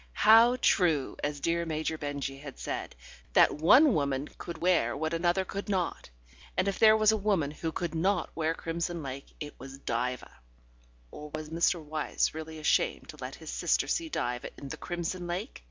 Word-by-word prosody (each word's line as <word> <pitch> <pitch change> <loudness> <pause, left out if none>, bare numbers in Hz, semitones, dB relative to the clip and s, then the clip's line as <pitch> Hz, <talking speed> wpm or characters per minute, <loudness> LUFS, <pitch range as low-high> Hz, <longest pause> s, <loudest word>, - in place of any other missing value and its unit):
How 230 +3 +8
true, 165 - +2
as 145 0 -2
dear 170 +4 0
Major 160 -1 -2
Benjy 145 -2 -4
had 140 -1 -9
said, - - -5 0.4
that - - +6
one 255 - +6
woman 140 -2 -1
could 170 -1 -6
wear 170 -9 +2
what 160 +2 -2
another 175 +3 +1
could 200 +3 -6
not.... 185 - -2 0.5
And 185 - +2
if 195 - -1
there 220 -1 +7
was 215 0 +5
a 220 - +1
woman 195 -8 +1
who 160 +2 -4
could 170 +1 -3
not 180 +2 0
wear 160 0 -1
crimson 170 0 -3
lake 135 0 -6
it 145 -1 -6
was 135 +2 -9
Diva.... 125 - -3 0.7
Or 150 0 -9
was 155 0 -7
Mr. 170 +2 +2
Wyse 155 0 -1
really 160 0 -7
ashamed 155 - +1
to - - -9
let - - -6
his - - -8
sister - - +1
see 330 -1 -1
Diva 120 - -2
in 140 - -8
the - - -6
crimson 175 0 -4
lake? 185 +8 -4
165 Hz, 185 wpm, -29 LUFS, 145-185 Hz, 0.7 s, How